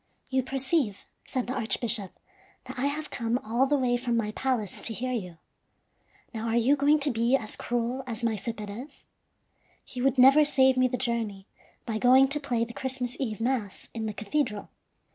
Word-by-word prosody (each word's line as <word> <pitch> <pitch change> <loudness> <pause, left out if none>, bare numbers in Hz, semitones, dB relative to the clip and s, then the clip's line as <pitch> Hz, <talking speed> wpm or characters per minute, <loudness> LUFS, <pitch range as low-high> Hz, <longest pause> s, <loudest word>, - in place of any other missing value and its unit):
"You 260 0 +2
perceive," 265 - -1 0.2
said 255 -2 -2
the 250 - -3
archbishop, 230 -4 0 0.5
"that - - -7
I 275 - +1
have 300 +2 -4
come 230 0 -1
all 235 +5 +1
the 290 +1 +2
way 245 -2 +1
from 240 -1 -1
my 210 -2 -1
palace 235 -4 -2
to 225 - -1
hear 255 +3 -2
you. 180 -9 -4 1.0
Now, 225 0 -4
are 225 - 0
you 240 +5 +4
going 290 +2 +4
to 285 0 +3
be 235 +2 +2
as 215 -5 -4
cruel 240 +2 -2
as 235 -1 -5
Maese 225 -1 -1
Perez? 210 +6 -7 1.0
He 250 - -6
would 270 0 +2
never 270 +4 +8
save 265 -2 +4
me 255 0 +4
the 250 - -2
journey, 230 -6 -2 0.4
by 220 -2 -2
going 260 +2 +6
to 295 +2 0
play 240 -5 -1
the 235 - -10
Christmas 255 -1 -2
Eve 225 -6 -2
mass 230 -4 -2
in 225 -1 -3
the 210 - -3
cathedral." 215 0 -2
245 Hz, 185 wpm, -28 LUFS, 225-265 Hz, 1.0 s, never